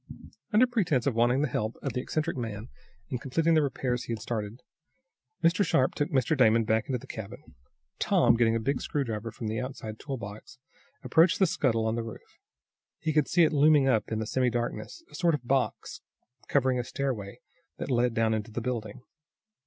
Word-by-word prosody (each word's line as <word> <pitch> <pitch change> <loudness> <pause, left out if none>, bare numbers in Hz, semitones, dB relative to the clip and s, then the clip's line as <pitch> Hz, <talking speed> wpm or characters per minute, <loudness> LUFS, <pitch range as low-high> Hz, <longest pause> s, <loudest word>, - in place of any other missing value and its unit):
Under 220 +4 +6
pretense 190 - 0
of 140 - +1
wanting 120 +4 +2
the - - +2
help 110 -2 -2
of 135 - -2
the 125 - -1
eccentric 155 +5 -2
man 115 -2 -5 0.4
in 125 - -3
completing 160 +6 +1
the 155 - +5
repairs 130 -3 -2
he - - -6
had 115 - -4
started, 110 +1 -5 0.8
Mr. 170 +5 +4
Sharp 130 -8 +2
took 145 - -1
Mr. 135 +2 +1
Damon 115 -4 +4
back 110 0 0
into 130 - -1
the 125 - -12
cabin. 100 -9 -9 0.5
Tom, - - +4
getting 115 -1 +3
a - - +1
big 140 +5 -1
screwdriver 115 -7 -3
from 115 0 -6
an 110 - -2
outside 125 -4 -6
toolbox, 115 -4 -7 0.5
approached 165 +8 +4
the 195 - +4
scuttle 115 -9 +1
on 110 - +1
the 115 - -1
roof. 115 -1 -10 0.6
He 155 - -2
could 150 -1 +3
see 175 -1 +4
it 160 - +3
looming 145 -1 +5
up 115 -5 +1
in 110 - 0
the 110 - -2
semidarkness, 120 - -2
a - - -18
sort 170 +1 +2
of 125 -4 -8
box, 135 0 -1 0.5
covering 130 -2 +2
a - - -1
stairway 120 -6 -4 0.4
that - - -4
led 120 -1 +2
down 110 0 +2
into 110 0 -3
the 115 - -4
building. 120 0 -4
125 Hz, 190 wpm, -28 LUFS, 115-145 Hz, 0.8 s, Under